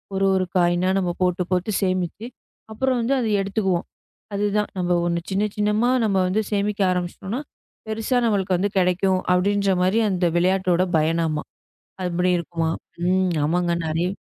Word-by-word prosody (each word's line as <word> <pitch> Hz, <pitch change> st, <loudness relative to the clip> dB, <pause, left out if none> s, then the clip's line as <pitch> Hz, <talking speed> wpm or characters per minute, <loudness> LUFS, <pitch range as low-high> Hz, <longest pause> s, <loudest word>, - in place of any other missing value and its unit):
ஒரு 195 Hz, 0 st, +1 dB
ஒரு 185 Hz, -1 st, +1 dB
காயினா 175 Hz, +1 st, +2 dB
நம்ம 180 Hz, -2 st, 0 dB
போட்டுப் 180 Hz, 0 st, 0 dB
போட்டுச் 185 Hz, +3 st, 0 dB
சேமித்து 185 Hz, +2 st, -1 dB, 0.5 s
அப்புறம் 255 Hz, +3 st, 0 dB
வந்து 235 Hz, +4 st, +1 dB
அதை 230 Hz, -3 st, -1 dB
எடுத்துக்குவோம். 195 Hz, -3 st, -1 dB, 0.5 s
அது 200 Hz, +1 st, 0 dB
தான் 210 Hz, -, 0 dB
நம்ம 180 Hz, 0 st, -1 dB
ஒன்னு 170 Hz, 0 st, 0 dB
சின்ன 195 Hz, +2 st, +1 dB
சின்னமா 210 Hz, +3 st, +1 dB, 0.2 s
நம்ம 200 Hz, -3 st, +1 dB
வந்து 195 Hz, +4 st, +1 dB
சேமிக்க 205 Hz, 0 st, 0 dB
ஆரம்பிச்சுட்டோம்னா, 185 Hz, +6 st, -3 dB, 0.5 s
பெருசா 225 Hz, +3 st, -1 dB
நம்மளுக்கு 195 Hz, -4 st, +1 dB
வந்து 200 Hz, +3 st, -1 dB
கிடைக்கும் 185 Hz, +1 st, +2 dB
அப்படின்ற 200 Hz, +2 st, +2 dB
மாதிரி 190 Hz, +5 st, +2 dB
அந்த 185 Hz, -2 st, 0 dB
விளையாட்டோட 185 Hz, 0 st, +2 dB
பயன் 160 Hz, +2 st, +1 dB
ஆமா. 155 Hz, -1 st, -2 dB, 0.6 s
அப்படி 180 Hz, 0 st, 0 dB
இருக்குமா! 165 Hz, -1 st, -2 dB, 0.4 s
ம். 185 Hz, 0 st, +2 dB
ஆமாங்க. 175 Hz, +2 st, +1 dB
நிறைய 165 Hz, +3 st, 0 dB
185 Hz, 150 wpm, -23 LUFS, 175-205 Hz, 0.6 s, காயினா